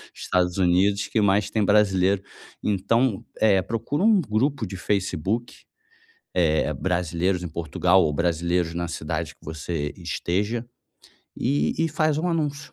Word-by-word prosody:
Estados 90 0 0
Unidos 95 +3 +2
que 110 - +1
mais 100 +1 +2
tem 110 -2 +1
brasileiro. 100 -1 +3 0.4
Então, 105 +3 +1
eh, 100 -3 +4
procura 115 - -2
um 220 -2 +5
grupo 130 +1 0
de 95 - -7
Facebook, 100 +3 -1 0.8
eh, 80 -3 +2
"Brasileiros 90 +2 -1
em 90 - -4
Portugal" 85 +4 +2
ou 75 - 0
"Brasileiros 85 +1 0
na 85 0 -2
cidade 80 0 -4
que - - -25
você 80 -1 -4
esteja", 95 +6 -2 0.7
e 75 +2 0
e 165 - +2
faz 155 -1 +1
um 175 +3 0
anúncio. 150 -4 -2
95 Hz, 135 wpm, -24 LUFS, 85-110 Hz, 0.8 s, um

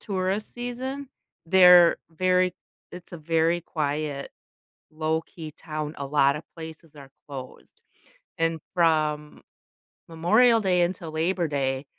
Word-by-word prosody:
tourist 195 +1 -3
season, 255 +3 -5 0.4
they're 180 -1 +7
very 185 +2 +1 0.4
it's 180 0 -11
a 175 - -7
very 165 +2 +1
quiet, 150 -3 -3 0.6
low-key 160 0 -4
town, 155 0 -6
a 140 - -4
lotta 140 +1 +2
places 160 -1 -10
are 140 -2 -13 0.2
closed. 130 -2 -10 0.6
And 165 0 0
from 155 -3 0 0.7
Memorial 220 +9 +3
Day 185 -3 +2
until 175 -2 -3
Labor 170 +2 0
Day, 135 -1 -2
165 Hz, 110 wpm, -25 LUFS, 150-180 Hz, 0.7 s, they're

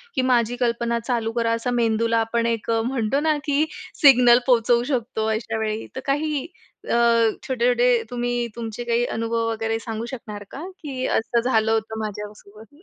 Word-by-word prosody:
की - - +2
"माझी 240 -1 +2
कल्पना 235 -1 0
चालू 230 -1 -2
करा," 230 -1 0
असा 230 +2 -1
मेंदूला 230 -1 +1
आपण 230 +1 0
एक 230 -1 -2 0.2
म्हणतो 250 +1 0
ना, 310 +1 +2
की 295 +1 +2 0.4
सिग्नल 250 -4 +7
पोहचवू 240 -1 +3
शकतो, 220 -3 -2
अशा 220 0 -3
वेळी 215 0 -3
तर - - -3
काही 290 0 -1 0.4
अ, - - +2 0.5
छोट-छोटे 245 -2 +2
तुम्ही 245 0 -1
तुमचे 230 0 -5
काही 235 0 +1
अनुभव 230 0 -1
वगैरे 225 0 -2
सांगू 225 0 -5
शकणार 230 -5 -7
का? 285 - -7 0.2
की 265 -5 -4
असं 235 +1 +1
झालं 225 -3 +2
होतं 220 0 -1
माझ्यासोबत? 210 +3 -8
235 Hz, 160 wpm, -23 LUFS, 225-245 Hz, 0.5 s, सिग्नल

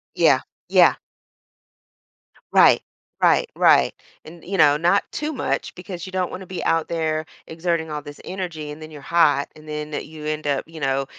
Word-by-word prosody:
Yeah, - - +5 0.3
yeah. - - +6 1.6
Right. - - +6 0.4
Right, - - +4
right. - - +4 0.3
And, 165 +1 -13
you 195 +1 -3
know, 145 -2 +6
not 175 +5 +3
too 305 +1 -3
much - - -2
because 180 -1 -7
you 185 - -9
don't 185 -1 -1
wanna 190 0 -7
be 185 - -5
out 165 -1 +1
there 160 -1 -1 0.2
exerting 165 -1 -2
all 150 0 -3
this 145 0 -11
energy, 170 -6 -5
and 150 - -10
then 155 0 -9
you're 150 -2 -10
hot, 145 -2 +3
and 155 - -15
then 150 0 -5
you 155 +1 -6
end 155 -1 -3
up, 140 -1 0
you 165 0 -11
know, 135 -1 0
160 Hz, 175 wpm, -22 LUFS, 150-175 Hz, 1.6 s, yeah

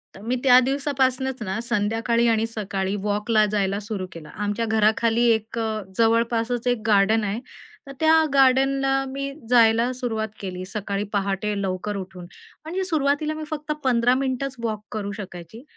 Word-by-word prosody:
तर 195 - -12
मी 235 +4 -1
त्या 250 -2 +7
दिवसापासनंच 265 -1 0
ना 200 +2 -3
संध्याकाळी 230 +1 +1
आणि 225 -1 +2
सकाळी 200 -3 -3
वॉकला 210 +1 +2
जायला 200 -1 0
सुरू 205 -2 -5
केलं. 160 -3 -10
आमच्या 205 +2 -2
घराखाली 220 +1 +2
एक 220 +1 -1
अ, 220 -1 -2 0.2
जवळपासच 230 +1 +1
एक 245 -3 +1
गार्डन 215 +2 +4
आहे 205 +2 -2 0.5
तर - - -8
त्या 320 0 +4 0.2
गार्डनला 270 0 +3
मी 275 +1 -4 0.2
जायला 230 0 +4
सुरुवात 230 -3 -2
केली 185 -2 -5
सकाळी 200 0 -3
पहाटे 200 +1 -1
लवकर 195 +2 -3
उठून, 185 -2 -8 0.4
म्हणजे 355 +5 -3
सुरुवातीला 305 -3 0
मी 310 0 -6
फक्त 300 0 -4
15 245 -1 +3
मिनिटच 265 0 -2
वॉक 215 -2 -2
करू 205 -2 -4
शकायची 185 +3 -9
225 Hz, 150 wpm, -23 LUFS, 205-260 Hz, 0.5 s, त्या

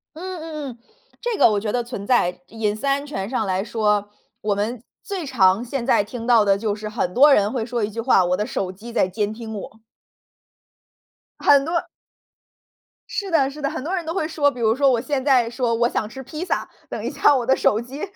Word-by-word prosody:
嗯 365 +1 -6
嗯 305 -3 -6
嗯， 235 - -14 0.4
这 475 -3 -1
个 - - +6
我 205 -1 +1
觉 210 0 -2
得 245 -1 0
存 230 -4 -7
在， 180 -8 +2
隐 215 -2 -1
私 265 - -6
安 280 +1 +1
全 195 -9 -4
上 235 -5 -1
来 190 +1 0
说， 210 -2 0 0.3
我 210 -1 0
们 220 +3 -3 0.2
最 380 -6 -5
常 215 -3 +3
现 250 0 -3
在 210 - +3
听 230 +2 -7
到 230 -4 +5
的 195 -1 +4
就 210 -1 -1
是 215 0 -6
很 210 -5 -2
多 285 +2 +7
人 205 -2 +3
会 240 -4 -2
说 240 -2 -2
一 205 - 0
句 225 +2 -7
话， 225 -6 +4
我 180 +1 +1
的 210 - -1
手 185 -4 -3
机 225 +5 -11
在 185 - +2
监 205 +3 -2
听 220 -1 -7
我。 220 +2 -9 1.6
很 280 -1 +5
多 335 +1 0 1.3
是 400 -2 -3
的 280 -5 +3
是 295 +2 -10
的 280 - 0
很 310 -4 -5
多 350 +5 -3
人 345 -3 -3
都 325 - -3
会 315 -5 -1
说， 295 -3 +2
比 250 - -9
如 225 0 +2
说 275 0 +4
我 235 -2 +1
现 275 -1 -2
在 255 -5 +3
说： 240 -1 0
“我 235 +1 +2
想 215 - -2
吃 265 +2 -9
披 305 +7 -6
萨。” - - -2 0.2
等 - - -5
一 - - -1
下 290 - +4
我 245 -3 0
的 265 - +4
手 215 - +2
机 265 +5 -9
235 Hz, 250 characters per minute, -22 LUFS, 210-280 Hz, 1.6 s, 多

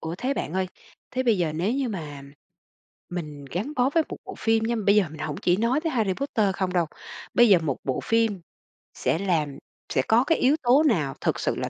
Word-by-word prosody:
Ủa 160 +1 -4
thế 265 +3 -1
bạn 160 - -3
ơi, 190 0 0 0.4
thế 255 - -1
bây 230 -6 +2
giờ 165 -3 0
nếu 180 +8 0
như 270 -1 -1
mà 150 -9 -6 0.9
mình 150 -5 -6
gắn 180 - -4
bó 255 +1 +3
với 325 +2 +3
một - - -6
bộ - - -8
phim 225 -1 +2
nha, 235 +1 0
bây 200 - +5
giờ 210 - +5
mình 155 - -10
hổng 150 -1 -3
chỉ 175 0 +2
nói 235 +7 +1
tới 325 - -1
Harry 215 -6 +1
Potter 215 -6 0
không 190 -2 -1
đâu. 175 -3 +2 0.5
Bây 240 -1 +6
giờ 195 - +7
một 150 -6 -2
bộ 130 - -1
phim 225 -4 +1 0.5
sẽ 160 - 0
làm 160 -8 0 0.4
sẽ 130 - +3
có 225 - +3
cái 325 +4 +2
yếu 275 +4 +4
tố 255 +5 +5
nào 165 - +1
thực - - 0
sự - - 0
là - - -3
200 Hz, 230 wpm, -25 LUFS, 160-240 Hz, 0.9 s, giờ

